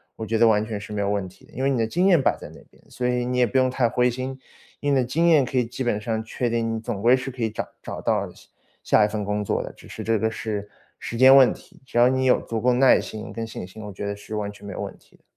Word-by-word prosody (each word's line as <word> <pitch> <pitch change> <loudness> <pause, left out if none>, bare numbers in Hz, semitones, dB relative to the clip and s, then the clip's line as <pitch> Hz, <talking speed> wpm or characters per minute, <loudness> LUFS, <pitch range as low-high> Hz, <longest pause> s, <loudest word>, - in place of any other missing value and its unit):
我 110 - -6
觉 110 +1 -1
得 115 - +6
完 105 -1 +3
全 110 -2 -5
是 100 - -10
没 105 -1 -2
有 100 - 0
问 100 -2 -2
题 90 - -20
的， - - -22
因 130 - -4
为 135 - +3
你 135 - +1
的 115 - +1
经 175 +11 +1
验 175 -4 +5
摆 135 - +2
在 - - -10
那 - - -14
边， - - -24
所 125 - -3
以 125 0 0
你 125 0 -2
也 125 - +4
不 130 +3 +1
用 130 - +3
太 125 -1 +1
灰 125 +1 +2
心。 130 +2 -5 0.4
以 145 - -1
你 140 - +3
的 130 - +3
经 155 +8 +1
验 155 -5 +5
可 130 - -7
以 125 - +3
基 125 +3 -5
本 105 -3 0
上 110 -1 -2
确 120 +2 -2
定， 115 -1 -1
你 - - -4
总 115 -3 -4
归 120 +4 +5
是 130 +1 -4
可 125 -2 -5
以 110 - 0
找 105 - -4 0.2
找 - - -6
到 - - 0
下 - - -19 0.3
下 105 - +4
一 - - +1
份 105 -1 -3
工 105 +1 -2
作 - - 0
的， - - -7
只 - - -16
是 - - -7
这 115 0 +1
个 110 +2 0
是 105 -2 -4 0.3
时 115 - -6
间 130 +2 +8
问 130 -2 +7
题。 - - -18
只 120 - -5
要 120 - +7
你 130 0 +1
有 125 - +4
足 115 -1 -4
够 125 +1 +3
耐 130 +1 +5
心 110 0 -8
跟 115 -1 -4
信 110 -5 -7
心， 110 +3 -11
我 105 - -7
觉 100 +1 -6
得 100 0 -3
是 105 +1 -8
完 105 -1 -2
全 105 0 -14
没 100 - -6
有 - - -7
问 - - -5
题 - - -26
的。 - - -36
115 Hz, 345 characters per minute, -24 LUFS, 105-130 Hz, 0.4 s, 间